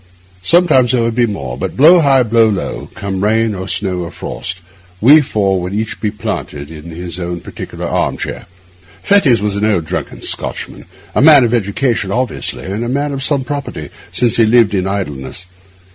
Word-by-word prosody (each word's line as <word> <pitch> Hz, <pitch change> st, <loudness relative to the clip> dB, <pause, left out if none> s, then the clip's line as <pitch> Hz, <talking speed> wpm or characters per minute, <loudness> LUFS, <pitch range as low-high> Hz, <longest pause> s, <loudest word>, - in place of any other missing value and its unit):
Sometimes 135 Hz, -, +4 dB
there 120 Hz, -2 st, +2 dB
would 115 Hz, 0 st, 0 dB
be 120 Hz, 0 st, +2 dB
more; 70 Hz, -, -5 dB
but -, -, -4 dB
blow 165 Hz, +6 st, +7 dB
high, 135 Hz, -4 st, +4 dB
blow 115 Hz, -1 st, +3 dB
low, 100 Hz, -3 st, -4 dB
come 95 Hz, -1 st, -4 dB
rain 110 Hz, +1 st, +2 dB
or 95 Hz, -1 st, -6 dB
snow 95 Hz, -3 st, -2 dB
or 85 Hz, -1 st, -4 dB
frost, 90 Hz, -, -6 dB, 0.4 s
we 145 Hz, +9 st, +7 dB
four 100 Hz, -9 st, 0 dB
would 90 Hz, +2 st, -5 dB
be -, -, -1 dB
each 110 Hz, 0 st, -4 dB, 0.2 s
planted 75 Hz, -5 st, -5 dB
in 75 Hz, -1 st, -10 dB
his 85 Hz, +1 st, -7 dB
own 85 Hz, 0 st, -4 dB
particular -, -, -8 dB
arm -, -, -1 dB
chair. -, -, -6 dB, 0.6 s
Fettes 150 Hz, -, +4 dB
was 105 Hz, -1 st, -1 dB
an 100 Hz, -, -2 dB
old 100 Hz, -7 st, +1 dB
drunken -, -, -5 dB
Scotchman, -, -, -4 dB, 0.3 s
a -, -, +2 dB
man 145 Hz, -2 st, +8 dB
of 120 Hz, 0 st, +1 dB
education 115 Hz, -1 st, 0 dB
obviously, 125 Hz, +1 st, -2 dB
and 100 Hz, +5 st, -3 dB
a 120 Hz, -, -3 dB
man 140 Hz, +3 st, -1 dB
of 135 Hz, -, -4 dB
some 140 Hz, 0 st, +1 dB
property, 140 Hz, +1 st, -5 dB, 0.2 s
since 120 Hz, -2 st, +1 dB
he 115 Hz, -, +5 dB
lived 115 Hz, -2 st, +4 dB
in 95 Hz, -1 st, 0 dB
idleness. 90 Hz, -4 st, -4 dB
110 Hz, 190 wpm, -15 LUFS, 95-130 Hz, 0.6 s, man